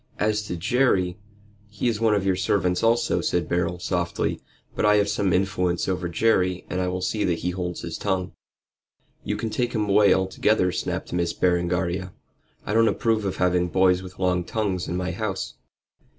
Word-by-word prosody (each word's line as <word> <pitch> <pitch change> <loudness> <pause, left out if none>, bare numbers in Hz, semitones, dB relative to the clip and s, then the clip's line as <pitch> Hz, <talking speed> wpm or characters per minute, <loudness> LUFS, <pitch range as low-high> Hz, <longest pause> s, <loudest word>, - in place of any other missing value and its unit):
"As 105 0 +1
to 90 - -4
Jerry 95 -2 +1 0.2
" 105 0 -29
"He 105 +3 -2
is 115 -2 -1
one 110 -2 +4
of 100 -2 -1
your 95 -1 +2
servants 90 -1 +1
also," 115 +1 +2
said 85 -3 0
Beryl, 85 0 0
softly; 85 -1 -2 0.3
"but - - -1
I 105 0 +5
have 100 -1 +3
some 100 -2 0
influence 90 -2 0
over 90 -2 -1
Jerry, 90 0 +1
and 90 - -1
I 90 - 0
will 90 0 -3
see 105 +3 -1
that 85 -2 +1
he 90 - -2
holds 90 -1 -4
his 85 -1 -6
tongue." 95 -3 -1 0.9
"You - - -2
can 115 - -3
take 120 +2 -1
him 105 -3 0
away 100 0 +5
altogether," 95 0 +2
snapped - - -4
Miss 85 -1 0
Berengaria. 90 +1 0 0.5
"I 105 - -2
don't 115 +1 +4
approve 110 -2 +1
of 95 - -2
having 90 -1 +2
boys 90 0 +3
with 95 -1 -11
long 90 -1 +1
tongues 95 -2 -2
in 90 - -2
my 90 0 -2
house. 95 - -3
95 Hz, 190 wpm, -24 LUFS, 90-105 Hz, 0.9 s, I